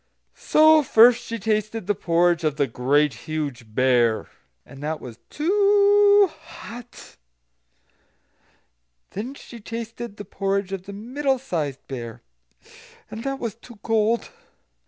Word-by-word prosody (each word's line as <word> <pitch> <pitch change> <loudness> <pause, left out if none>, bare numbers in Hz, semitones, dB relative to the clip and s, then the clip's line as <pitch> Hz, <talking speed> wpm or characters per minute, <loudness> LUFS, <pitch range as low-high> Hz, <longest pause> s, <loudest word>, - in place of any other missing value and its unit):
So 310 0 +5
first 240 -3 +5
she 230 - -4
tasted 215 0 -2
the 205 - +1
porridge 170 -2 +1
of 155 -2 0
the 145 -1 +1
Great 135 +4 +1 0.2
Huge 140 -8 -5
Bear, 120 -3 +2 0.4
and 135 - -13
that 155 +1 -3
was 120 -2 -10
too 405 +3 +4
hot. 235 +4 -12 2.0
And 210 +5 -4
then 265 - -8
she 240 -4 -12
tasted 230 0 -7
the 205 - -8
porridge 195 -1 -2
of 195 0 -6
the 200 - -7
Middle 265 +6 -1
sized 160 - -4
Bear, 120 -4 -7 0.9
and 225 - -7
that 275 0 -2
was 230 -5 -4
too 230 +1 -15
cold. 225 +1 0
210 Hz, 130 wpm, -23 LUFS, 150-245 Hz, 2.0 s, So